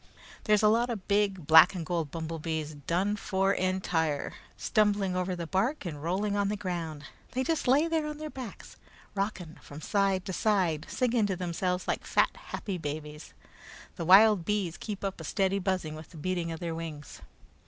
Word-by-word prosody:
There's 210 0 +4
a - - +7
lot 230 +3 +3
of 215 -6 -5
big 200 -4 +1
black 160 +5 +8
and 170 -3 -4
gold 165 -3 -1
bumblebees, 160 -1 -4
done 190 +5 +1
for 195 -1 +1
entire, 175 -6 0 0.2
stumbling 205 -4 +1
over 180 0 -1
the 170 -1 -4
bark 200 - 0
and 150 -4 -5
rolling 195 +5 -1
on 200 -1 +1
the 210 - -2
ground. 170 -6 -4 0.3
They 260 +1 0
just 320 -1 -1
lay 285 +6 +4
there 320 -2 0
on 300 -1 -5
their 310 0 -6
backs, 255 -6 -9 0.4
rocking 195 -5 -3
from 145 - -10
side 195 +1 +1
to 190 - -4
side, 180 -7 +1
singing 240 -4 +1
to 190 - -1
themselves 180 +1 -2
like - - -1
fat, - - +2
happy 190 -4 -5
babies. 150 0 -6 0.6
The - - -4
wild 200 +1 +7
bees 190 -3 -1
keep 205 -3 -6
up 195 -4 -3
a - - -7
steady 195 +4 0
buzzing 185 -5 -1
with 155 0 -10
the 170 - -13
beating 175 +1 -2
of 165 - -5
their 170 -2 -3
wings. 160 -3 -7
185 Hz, 185 wpm, -29 LUFS, 165-205 Hz, 0.6 s, black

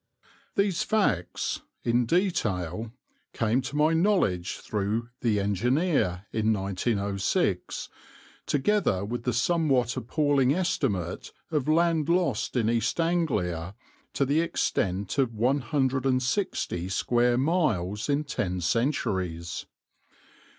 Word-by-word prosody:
These 200 -3 +1
facts, 185 - 0 0.2
in 120 0 +2
detail, 110 - 0 0.4
came 115 +3 +1
to 130 +3 -6
my 155 +2 +3
knowledge 165 - +1
through 110 +3 -2
the 110 -4 +1
Engineer 105 - +1
in 110 0 +1
1906, 100 0 -1 0.6
together 145 - +1
with 115 +2 -4
the 125 - +1
somewhat 130 -2 +2
appalling 140 +2 +2
estimate 105 - -1 0.2
of 150 -4 0
land 165 -1 +2
lost 170 -12 +1
in 115 -3 +2
East 115 +6 0
Anglia 105 - 0 0.4
to 140 - +1
the 145 +4 +2
extent 100 - -1
of 120 -4 +1
160 130 - 0
square 120 +5 +2
miles 125 - 0
in 145 +1 +2
ten 90 -10 -2
centuries. 90 - -1
120 Hz, 100 wpm, -27 LUFS, 100-150 Hz, 0.6 s, my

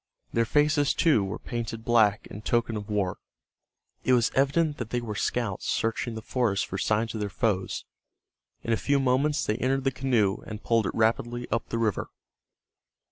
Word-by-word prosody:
Their 115 0 +2
faces, 150 +2 +2
too, 150 -11 +4
were 95 +1 -3
painted 115 -1 -5
black 110 -2 +3
in 105 - -9
token 115 +1 0
of 105 -1 -6
war. 100 -3 -1 0.8
It 130 - +3
was 120 -2 +3
evident 145 +3 +2
that 120 -2 -5
they 120 - 0
were 115 -3 -5
scouts 105 -2 -2
searching 115 +1 -1
the 110 - -6
forest 115 -6 0
for 95 - -5
signs 110 +3 0
of 110 - -4
their 105 -1 -2
foes. 95 -2 -1 0.8
In 115 - 0
a - - +2
few 140 +4 +1
moments 135 +3 +2
they 105 - 0
entered 130 +1 0
the 135 - +2
canoe, 120 -7 +1
and 105 0 -7
poled 115 -2 +2
it - - -4
rapidly 120 +2 0
up 115 +1 -1
the 115 - -2
river. 110 -4 0
115 Hz, 185 wpm, -27 LUFS, 105-130 Hz, 0.8 s, too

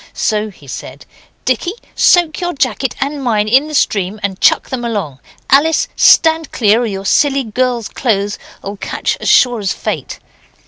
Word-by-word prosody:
So 215 -1 0
he 180 -7 -17
said, 130 - -9 0.4
'Dicky, 360 - 0 0.2
soak 345 -2 +3
your 350 0 -2
jacket 260 -2 -1
and 280 0 -3
mine 215 -4 +1
in 265 +7 +3
the 305 - -5
stream 200 -5 0
and 195 -2 -3
chuck - - +3
them 255 -2 -3
along. 200 - -4 0.3
Alice, 305 +4 +3
stand 320 -1 +4
clear, 220 0 +2
or - - 0
your 195 -2 -5
silly 275 +5 +2
girl's 240 0 -1
clothes'll 205 -3 -3
catch - - -2
as - - -2
sure 245 -3 +4
as 195 -2 -1
fate. - - -5
240 Hz, 165 wpm, -15 LUFS, 205-280 Hz, 0.4 s, stand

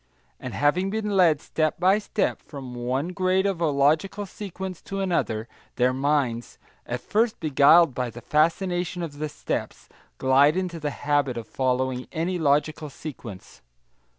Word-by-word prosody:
And - - -6
having 175 +7 +2
been 210 0 -2
led 170 -6 +5
step 155 0 -1
by 190 +3 +4
step 210 0 -1
from 135 -4 -9
one 125 +6 -2
grade 185 +1 +1
of 195 -4 -1
a 165 - +3
logical 155 +8 +1
sequence 190 -2 -7
to 195 - -5
another, 120 - -1 0.3
their 125 +1 +2
minds 135 -4 -1 0.3
at 120 +1 -3
first 220 +2 0
beguiled 155 +1 +5
by 125 0 -2
the 120 +1 -10
fascination 175 - 0
of 145 -3 -7
the 155 0 -2
steps - - -5 0.3
glide 140 +5 +4
into 180 -3 -3
the 150 -1 -2
habit 145 -3 0
of 115 - -6
following 130 -1 -1
any 175 +2 -2
logical 150 +1 +1
sequence. 125 -10 -10
155 Hz, 150 wpm, -25 LUFS, 130-180 Hz, 0.3 s, led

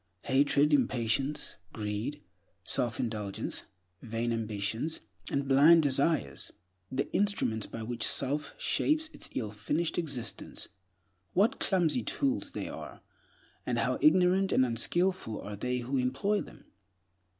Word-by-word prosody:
Hatred, 140 +2 +3
impatience, 130 +2 0 0.2
greed, 110 +7 -4 0.4
self 120 -2 0
indulgence, 105 -4 -3 0.4
vain 115 +1 -2
ambitions, 110 +6 -2 0.3
and 140 0 -1
blind 150 +5 +7
desires—the 130 - 0
instruments 195 - +1
by 115 - -6
which 120 0 -5
self 140 +3 0
shapes 315 +1 +1
its - - -5
illfinished 125 +10 -1
existence, 140 -8 -4 0.6
what 200 +5 +3
clumsy 185 +3 +2
tools 275 +1 -1
they - - -4
are, - - -8 0.6
and - - -1
how - - 0
ignorant 190 -8 +4
and 130 - +4
unskillful 125 - 0
are 105 0 -6
they 125 +5 -2
who 130 +3 -2
employ 135 +12 +1
them! - - -12
135 Hz, 115 wpm, -30 LUFS, 115-165 Hz, 0.6 s, blind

